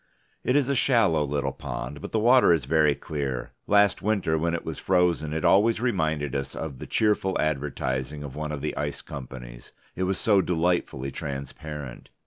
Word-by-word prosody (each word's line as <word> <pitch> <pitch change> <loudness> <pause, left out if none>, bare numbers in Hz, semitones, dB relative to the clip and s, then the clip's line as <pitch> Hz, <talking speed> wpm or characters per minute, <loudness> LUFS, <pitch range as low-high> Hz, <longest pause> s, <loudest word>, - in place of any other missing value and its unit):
It 125 - +1
is 145 -3 +3
a 140 - +1
shallow 115 - +3
little 70 -1 -1
pond, 70 0 -6
but - - -7
the - - 0
water 120 -1 +5
is 80 -6 +2
very 75 0 +3
clear; 65 -5 -4 0.2
last 100 -1 +4
winter 100 -6 +1
when 85 +2 0
it 85 - -5
was - - -4
frozen 90 -4 +1
it 80 0 -2
always 110 +3 +4
reminded 80 - 0
us 70 -1 -3
of 70 -6 -5
the - - -7
cheerful 105 -3 +1
advertising 75 -1 -2
of 70 -3 -8
one 75 0 -4
of 75 -2 -4
the 75 - -3
ice 75 0 -3
companies, - - -9 0.2
it 95 - -1
was 95 +1 0
so 100 -3 +4
delightfully 85 -6 0
transparent. 70 0 -7
80 Hz, 180 wpm, -26 LUFS, 70-95 Hz, 0.2 s, water